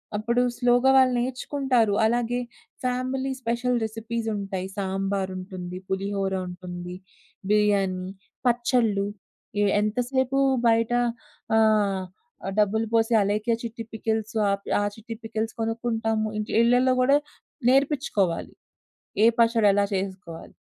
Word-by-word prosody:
అప్పుడు 235 +4 +1 0.2
స్లోగా 245 +1 +3
వాళ్ళు 260 -1 +5
నేర్చుకుంటారు. 250 -2 0
అలాగే 240 +1 +1 0.4
ఫ్యామిలీ 255 +1 -1
స్పెషల్ 245 +1 0
రెసిపీసుంటాయి. 220 -4 -3
సాంబారుంటుంది, 190 -2 -3
పులిహోరుంటుంది, 185 -2 -3 0.5
బిర్యానీ, 200 -3 +2 0.4
పచ్చళ్ళు. 235 -4 +2 0.6
ఎ - - +4 0.2
ఎంతసేపు 250 +5 0 0.3
బయట 230 0 +3 0.7
ఆహ్, 210 -3 +3 0.6
డబ్బులు 220 +2 +2
పోసి 225 +1 +3
అలేఖ్య 210 +3 0
చిట్టి 230 0 -5
పికిల్స్ 220 0 -2
ఆహ్, 200 0 0 0.2
ఆహ్, 205 0 0
చిట్టీ 225 +1 -8
పికిల్స్ 225 0 -3
కొనుక్కుంటాము. 225 -1 -1
ఇంట్లో 215 - -3
ఇళ్లల్లో 250 +2 +4
గూడా 275 +3 +5 0.5
నేర్పిచ్చుకోవాలి. 260 - +1 0.7
ఏ - - +8
పచ్చడి 230 -2 +4
ఎలా 200 0 +3
చేసుకోవాలి. 190 -3 -6
220 Hz, 100 wpm, -25 LUFS, 200-240 Hz, 0.7 s, ఏ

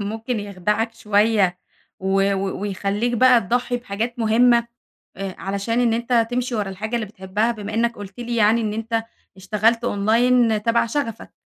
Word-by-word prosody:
ممكن 220 +2 -3
يخدعك 210 +3 -2
شويّة؟ 205 -4 +2 0.4
و 195 +1 +2
و 195 0 -3
ويخليك 205 +3 -1
بقى 250 0 +5
تضحي 245 +4 -1
بحاجات 235 +1 -4
مهمة، 235 +1 +4 0.5
آآ، 195 -1 -5
علشان 200 +5 -2
إن 235 -2 +2
أنتَ 235 0 +1
تمشي 245 0 -2
ورا 205 -3 -1
الحاجة 215 +5 -5
اللي 230 -3 -1
بتحبها 205 +4 -2
بما 210 -1 -7
إنك 235 +1 0
قلت 200 +2 -9
لي 240 0 -3
يعني 220 +2 +4
إن 215 -2 -2
أنتَ 225 +1 -2 0.3
اشتغلت 215 +5 +1
online 225 +1 +2
تَبَع 230 +1 +2
شغفك؟ 230 -2 -4
220 Hz, 155 wpm, -21 LUFS, 200-235 Hz, 0.5 s, بقى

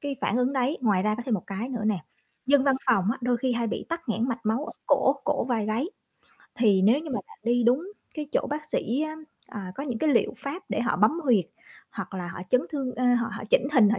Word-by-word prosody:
cái 280 -2 -3
phản - - +1
ứng 250 +2 +2
đấy. 265 +4 0
Ngoài 200 -6 +2
ra 215 0 +2
có 240 - -5
thêm 235 - +2
một 180 - -2
cái 200 +5 -4
nữa 240 -5 -4
nè, 210 -4 +2 0.5
dân 280 0 +5
văn 270 -1 +4
phòng 225 -8 +4
á - - -7
đôi 245 0 +1
khi 250 +1 0
hay 235 -1 0
bị - - -3
tắc 335 -4 -4
nghẽn 225 +3 0
mạch 235 -1 -2
máu 230 +7 +1
ở - - -7
cổ 275 -1 +4
cổ 295 -5 +1
vai 230 -4 0
gáy, 225 +7 0 0.7
thì 205 -6 +4
nếu 230 +9 +5
như 315 -2 -7
mà 250 - -1
bạn 440 -1 -17
đi 240 +1 +2
đúng 285 - +2 0.2
cái 300 -2 -4
chỗ - - +1
bác 300 +1 -3
sĩ 265 -3 -1
á, 310 0 -3 0.3
à, 190 -3 -6
có 275 - -5
những 250 -6 -3
cái 310 - +2
liệu 240 - +2
pháp 305 +7 -5
để - - -1
họ 240 - +1
bấm 220 - +3
huyệt, 220 - +4 0.5
hoặc 195 -1 -6
là 180 -2 -4
họ 180 0 -7
chấn 250 - +5
thương 270 -4 -3
ơ, 255 - -1
họ 235 -1 +1
họ - - -6
chỉnh - - +5
hình, 230 -7 +6
họ 235 - +1
245 Hz, 265 wpm, -27 LUFS, 220-280 Hz, 0.7 s, hình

